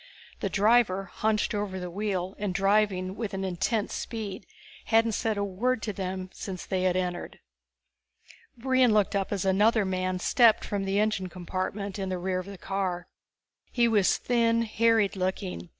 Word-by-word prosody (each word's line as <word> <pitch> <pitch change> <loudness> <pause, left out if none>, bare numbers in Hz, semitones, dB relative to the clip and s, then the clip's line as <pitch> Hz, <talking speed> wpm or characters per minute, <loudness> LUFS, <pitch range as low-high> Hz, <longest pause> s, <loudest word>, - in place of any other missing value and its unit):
The - - -2
driver, 200 -3 +2
hunched 215 +1 0
over 205 -2 -3
the 180 -1 -6
wheel 190 -1 -2
and 200 -3 -2
driving 195 -1 +2
with 215 -3 -4
an 195 - -3
intense 195 +4 -1
speed, 205 -5 -5 0.4
hadn't 225 0 +3
said 220 0 -1
a 200 - 0
word 215 +5 -1
to 210 - -2
them 185 -1 -4
since 185 -3 -6
they 185 -1 -1
had 180 -1 +2
entered. 180 -1 -3 1.2
Brion 255 -2 +3
looked 205 -1 +2
up 195 -1 -1
as 195 -2 -1
another 205 +3 +3
man 185 0 -1
stepped 225 +4 +4
from 200 -1 -2
the 195 +1 +1
engine 210 -3 0
compartment 185 +3 -4
in 190 -1 -3
the 185 - -2
rear 185 +1 -1
of 185 - -7
the 200 -1 -8
car. 185 -2 -3 0.6
He 240 -2 +3
was 210 -4 +3
thin, 230 -1 +2
harried 225 -2 +2
looking. 90 - -3
195 Hz, 165 wpm, -27 LUFS, 185-215 Hz, 1.2 s, stepped